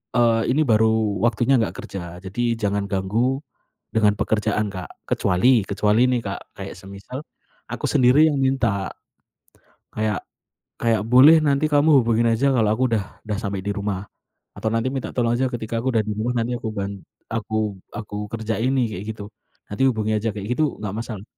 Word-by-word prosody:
Eee, 115 -2 +3
ini 150 +5 +2
baru 110 -3 +2
waktunya 120 +3 +2
nggak 110 - -2
kerja. 90 -4 -7
Jadi 115 +6 -2
jangan 100 -1 -1
ganggu 110 +7 0 0.6
dengan 105 -2 +4
pekerjaan 110 0 0
Kak, 95 -1 -6 0.2
kecuali 120 +7 +3
kecuali 105 +5 +3
nih 125 -1 +2
Kak 100 -1 -3 0.2
kayak - - -6
semisal, 100 +8 -8 0.5
aku - - -4
sendiri 130 +5 +5
yang 145 - -1
minta, 120 -8 +1 1.1
kayak 110 -3 0 0.6
kayak, 115 -3 +1
"Boleh 130 +8 +7
nanti 145 +1 +2
kamu 145 -1 +5
hubungin 115 0 +2
aja 130 +5 +2
kalau 110 -2 +3
aku 115 +4 -1
udah 100 - -2 0.2
udah 105 -1 -2
sampai 100 -2 -3
di 100 - -6
rumah." 100 -1 -3 0.5
Atau, 110 - -4
"Nanti 115 +2 0
minta 135 -1 -5
tolong 120 -2 +1
aja 130 +2 +1
ketika 115 -2 -3
aku 120 - -3
udah 110 - +3
di - - -1
rumah, 120 +3 -1
nanti 120 +1 0
aku 115 - -5
ban 100 0 -2 0.4
aku 110 -2 -2 0.2
aku 105 -1 -6 0.2
kerjain 115 +2 -1
nih," 130 -2 +2
kayak - - -6
gitu. 105 - -8 0.5
Nanti 105 +6 -1
hubungi 110 -4 0
aja 115 +2 -1
kayak 100 -1 -5
itu 155 - +4 0.2
nggak 105 -2 -4
masalah. 110 -4 -6
110 Hz, 175 wpm, -22 LUFS, 105-125 Hz, 1.1 s, Boleh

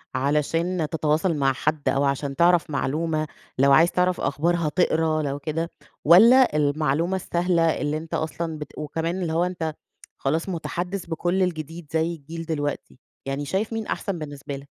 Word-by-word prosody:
علشان 155 +4 0
تتواصل 160 +2 +1
مع 135 -1 +2
حد 150 0 -1
أو 140 +1 +1
عشان 140 0 -1
تعرف 170 -1 +3
معلومة، 155 +3 -1 0.3
لو 140 +1 +4
عايز 165 +5 +6
تعرف 180 0 +1
أخبار 145 +6 +1
هتقرا 160 -1 +1
لو 140 -1 -3
كده، 160 +3 -3 0.4
والَّا 230 - +7
المعلومة 150 +4 +1
السهلة، 170 -2 +1
اللي 150 +1 0
أنت 160 +1 -9
أصلًا 160 0 -3
بت 150 - -9
وكمان 165 +4 -3
اللي 160 -2 -2
هو 170 +2 +2
أنت 165 -4 -2 0.4
خلاص 160 +7 -1
مُتحدث 180 +2 -3
بكل 175 +3 0
الجديد 165 -2 -4
زي 165 +1 0
الجيل 165 +3 -8
دلوقتي. 145 -4 -4 0.3
يعني 135 +1 -3
شايف 205 +8 -1
مين 225 -1 -3
أحسن 195 -5 -3
بالنسبة 145 -2 -6
لك؟ 140 +1 -11
160 Hz, 160 wpm, -24 LUFS, 145-175 Hz, 0.4 s, والَّا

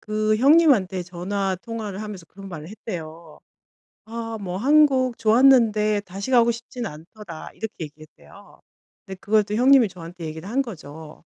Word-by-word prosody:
그 215 0 0
형님한테 255 - +4
전화 185 +2 -3
통화를 215 -3 -6
하면서 200 -5 -8
그런 195 +2 -12
말을 160 -3 -8
했대요. 165 -6 -8 0.7
"아 225 0 -6
뭐 180 -2 -5
한국 265 0 +3
좋았는데 220 -3 +4
다시 195 +6 -6
가고 235 -2 +5
싶진 235 +1 -7
않더라." 165 +1 -10
이렇게 220 -1 -6
얘기했대요. 155 +1 -17 0.5
네 190 - -6
그걸 210 +3 +2
또 205 +1 -4
형님이 255 -1 +5
저한테 175 -1 -10
얘기를 160 +3 -7
한 265 +5 +1
거죠. 160 - -10
210 Hz, 320 characters per minute, -23 LUFS, 180-230 Hz, 0.7 s, 가고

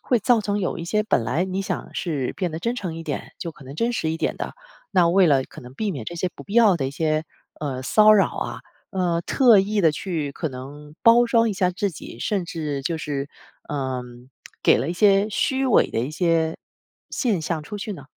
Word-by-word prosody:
会 245 - +5
造 235 +2 +3
成 205 -1 -1
有 185 - -1
一 165 - -5
些 210 +5 +1
本 210 - +2
来 150 +10 0
你 190 +1 -3
想 - - -5
是 145 -7 -2
变 180 -3 -1
得 160 - -5
真 235 +8 -1
诚 180 -9 -5
一 165 - -6
点 - - -5
就 170 - -5
可 150 - -16
能 135 +2 -9
真 235 +7 0
实 160 -9 -1
一 160 - -2
点 - - -1
的， - - -5 0.4
那 180 -4 +4
为 185 +2 +5
了 140 -4 +4
可 - - -13
能 125 0 -12
避 215 +4 -2
免 135 -9 -6
这 170 - -6
些 180 +2 -1
不 - - -10
必 200 - -11
要 220 -6 +6
的 135 -5 -2
一 - - -3
些， 155 +2 0 0.4
呃 135 -4 -3
骚 215 +10 +6
扰 200 -2 +5
啊， - - -3 0.3
呃 175 -3 0
特 235 0 +5
意 205 +2 0
地 160 -3 +4
去 155 -4 -3
可 160 - -3
能 145 +3 -10
包 235 +1 +7
装 230 -1 +3
一 - - -1
下 185 -2 +1
自 190 +3 -1
己？ 120 - -10
甚 195 - -1
至 150 -5 -4
就 165 +4 -1
是， 145 -2 -3 0.4
呃 130 -3 -2 0.6
给 - - +6
了 130 +6 -2
一 - - -1
些 200 +2 +4
虚 265 +5 0
伪 250 - +4
的 - - 0
一 125 +5 -3
些 165 -1 +1 0.5
现 220 -9 0
象 160 0 -2
出 205 +7 -7
去 210 +1 -4
呢？ 145 -8 -9
170 Hz, 250 characters per minute, -23 LUFS, 150-205 Hz, 0.6 s, 包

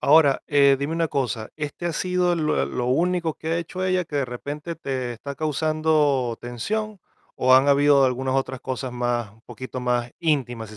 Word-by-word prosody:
Ahora, 145 -2 +5
eh, 140 -2 +5
dime 140 +3 -2
una 165 -1 0
cosa, 115 -6 -2
¿este 150 +3 -4
ha 170 - -1
sido 180 +1 +1
el 160 -3 0
lo - - +1
eh - - -1
lo 125 - -3
único 170 +4 +1
que 160 - -7
ha 165 - +1
hecho 180 +2 -5
ella, 185 -1 +1
que 150 - -5
de 140 - +1
repente 145 +6 -6
te 130 -5 -3
está 140 +5 -7
causando 155 -4 +1
tensión? 210 - -4 0.4
¿O 130 0 +6
han 135 +2 +5
habido 140 -1 +5
algunas 130 +1 0
otras 130 -1 -1
cosas 130 -1 -4
más 120 -3 -1
un 110 - -23
poquito 130 +2 -7
más 120 -1 0
íntimas?, 120 -9 -1
si 110 - -11
140 Hz, 200 wpm, -24 LUFS, 125-160 Hz, 0.4 s, O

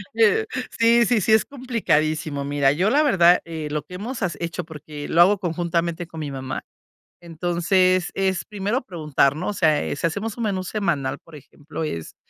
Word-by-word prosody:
Eh, 230 - +4 0.3
sí, 235 0 +5
sí, 230 -3 +2
sí, 220 - +3
es 220 - +4
complicadísimo. 155 - -1
Mira, 140 -1 +2
yo 180 +8 +1
la 290 +5 +4
verdad, 180 - +5
eh, 160 -2 -5
lo 150 -2 -2
que 180 +4 -11
has - - -7
hemos 245 +4 -5 0.2
hecho, 170 +1 -4
porque 150 -2 -9
lo 170 - +4
hago 200 +4 +6
conjuntamente 170 -1 -2
con 160 - -9
mi 145 - -4
mamá. 130 -1 -5 0.6
Entonces 175 +2 +1
es 190 -1 -1
primero 210 +4 -2
preguntar, 150 - +1
¿no? 170 +4 -3
O - - -2
sea, 155 -6 +1
si 165 - +1
hacemos 205 +6 -4
un 235 - -3
menú 190 -3 -1
semanal, 170 -10 -1
por 165 - -15
ejemplo, 150 +2 -8
es, 85 - -5
175 Hz, 185 wpm, -23 LUFS, 155-205 Hz, 0.6 s, hago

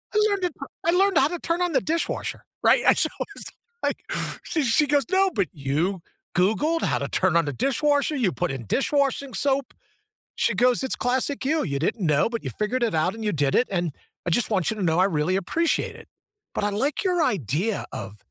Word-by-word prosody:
I - - +5
learned 400 -2 -1
it, 350 - -2 0.3
I 335 - +4
learned 380 0 +3
how 270 - +5
to 345 +2 -5
turn 335 +1 -1
on 355 - 0
the 265 - +2
dishwasher, 330 +5 -2 0.2
right? - - +5
And - - +6
so - - +3
I - - +1
was - - -4 0.4
like, - - -2 0.4
she 320 - -1
she 265 +4 +3
goes, 285 -1 +2
"No, 380 0 +3
but 200 - 0
you 155 +7 -1 0.4
googled 285 - +2
how - - +1
to - - -2
turn 185 -2 +1
on 170 -2 +4
the 145 - -3
dishwasher, 285 - +1
you 235 -9 +1
put 175 -3 -2
in 130 -4 -5
dish-washing 275 - 0
soap." 275 0 0 0.6
She - - +1
goes, 250 +1 +3
it's 265 - -2
classic 260 +3 -1
you. 310 +3 +1
You 140 -3 -2
didn't 180 +6 -1
know, 150 +1 +3
but 230 -1 -4
you - - -4
figured 225 +4 0
it 230 -7 +1
out 160 +4 +1
and 225 0 -7
you 210 - +1
did 145 -3 +1
it, 250 - +3
and 175 -4 -1 0.3
I - - 0
just 230 +8 +2
want 190 -5 +1
you - - -5
to 210 - -4
know 165 -2 +2
I 185 - +5
really 175 -1 +1
appreciate 325 - 0
it. - - -14 0.5
But - - -1
I 205 - +1
like 270 - -1
your 360 -3 +2
idea 190 - -1
of 105 - -6
235 Hz, 225 wpm, -24 LUFS, 175-295 Hz, 0.6 s, And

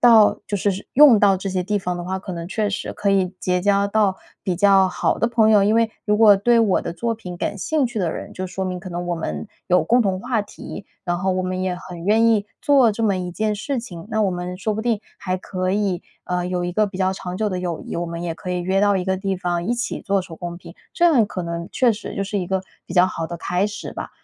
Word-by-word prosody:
到 225 -3 +6
就 205 - 0
是 200 +1 +1
是 190 - -8
用 270 -6 +8
到 195 -2 +5
这 195 +1 -4
些 185 -1 -1
地 205 +3 0
方 180 -2 -3
的 175 - -5
话， 190 +2 -3
可 190 0 -7
能 170 0 -6
确 210 +1 0
实 200 - -4
可 200 - -2
以 190 -2 +2
结 180 -5 0
交 200 +1 +2
到 200 -2 +2 0.3
比 180 -2 -1
较 195 0 +5
好 - - 0
的 230 - +1
朋 225 -2 +3
友。 210 -2 +6
因 210 +3 +3
为 230 -1 +2
如 210 0 +2
果 210 -2 +7
对 235 +4 +3
我 215 -5 +3
的 - - -4
作 230 +6 -2
品 180 -6 -8
感 205 - -2
兴 285 +6 0
趣 230 -3 -4
的 170 -3 0
人， - - -7
就 185 - -5
说 185 +1 -4
明 180 -1 -3
可 185 0 -8
能 175 0 -4
我 175 - 0
们 165 +6 -4 0.2
有 180 -3 +4
共 240 +8 +4
同 190 -3 0
话 235 0 -1
题， 205 0 -9 0.2
然 175 -2 0
后 190 0 +1
我 185 0 0
们 185 0 -2
也 185 -1 -1
很 175 -1 -9
愿 220 +3 +4
意 220 -3 +3 0.2
做 270 -5 +5
这 225 +2 -2
么 200 -3 +2
一 180 -1 -3
件 215 +4 -1
事 255 +6 -3
情。 185 -6 -8
那 220 - 0
我 200 - +2
们 180 0 -5
说 210 +3 -1
不 220 - -3
定 230 -3 0 0.2
还 185 0 -2
可 185 0 -3
以， 195 -2 0 0.2
呃， 180 -1 -1
有 180 -1 -1
一 175 - -3
个 215 +3 +2
比 195 -1 -8
较 190 0 +2
长 180 -1 -6
久 215 0 0
的 185 -2 -3
友 175 -3 -3
谊， - - -7
我 170 - -1
们 170 0 -5
也 165 - -2
可 180 - -7
以 180 0 -1
约 190 +2 +1
到 205 -1 +3
一 185 - -1
个 190 0 0
地 195 0 -2
方， 175 -1 -2
一 225 - 0
起 240 +1 -3
做 195 0 +1
手 180 -3 -9
工 175 +1 -6
品， 170 0 -12 0.2
这 345 - +1
样 285 -10 +5
可 185 -3 -5
能 170 0 -4
确 250 -3 +3
实 215 - -7
就 195 - -1
是 205 +1 -2
一 180 - -5
个 190 -1 -1 0.2
比 - - -8
较 180 0 +5
好 165 -3 -4
的 170 - -5
开 180 +4 0
始 205 - -7
吧。 - - -6
190 Hz, 300 characters per minute, -22 LUFS, 180-215 Hz, 0.3 s, 用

